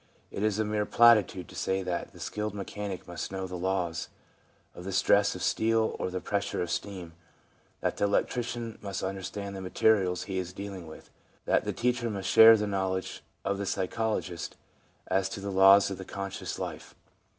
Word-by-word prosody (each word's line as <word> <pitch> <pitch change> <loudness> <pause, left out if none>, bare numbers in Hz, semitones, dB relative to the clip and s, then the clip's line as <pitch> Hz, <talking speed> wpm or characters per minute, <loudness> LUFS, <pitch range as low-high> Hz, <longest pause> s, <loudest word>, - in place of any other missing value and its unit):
It - - -5
is 105 -1 +1
a 110 - +1
mere 105 0 -1
platitude 110 -6 +5
to - - -12
say 95 0 -1
that 90 -1 -3
the - - -15
skilled 105 -1 -4
mechanic 100 -1 -5
must 85 0 -5
know 95 -1 -3
the 90 0 -6
laws 90 -2 -2 0.6
of 90 - -10
the 95 - -5
stress 100 +1 +3
of 90 - -5
steel 110 0 +1
or - - -1
the 90 0 -3
pressure 100 +1 -2
of 90 - -4
steam, 90 -5 -4 0.7
that - - -1
the - - +2
electrician 115 +2 -1
must 100 -1 -4
understand 95 +1 -4
the 95 - -6
materials 95 -1 +2
he 95 -2 -3
is 90 0 -5
dealing 95 -3 -7
with, 80 - -12 0.3
that - - +2
the - - -1
teacher 120 -1 0
must 100 -3 -3
share 115 0 +9
the 105 - -1
know 95 -2 -1
ledge 95 0 -4 0.2
of 100 0 -1
the 100 - -2
psychologist 95 -3 -2 0.5
as 95 0 +1
to 115 - -6
the 100 0 -4
laws 95 +1 +6
of 95 - -5
the - - -5
conscious 100 0 -5
life. - - -6
100 Hz, 190 wpm, -29 LUFS, 95-105 Hz, 0.7 s, share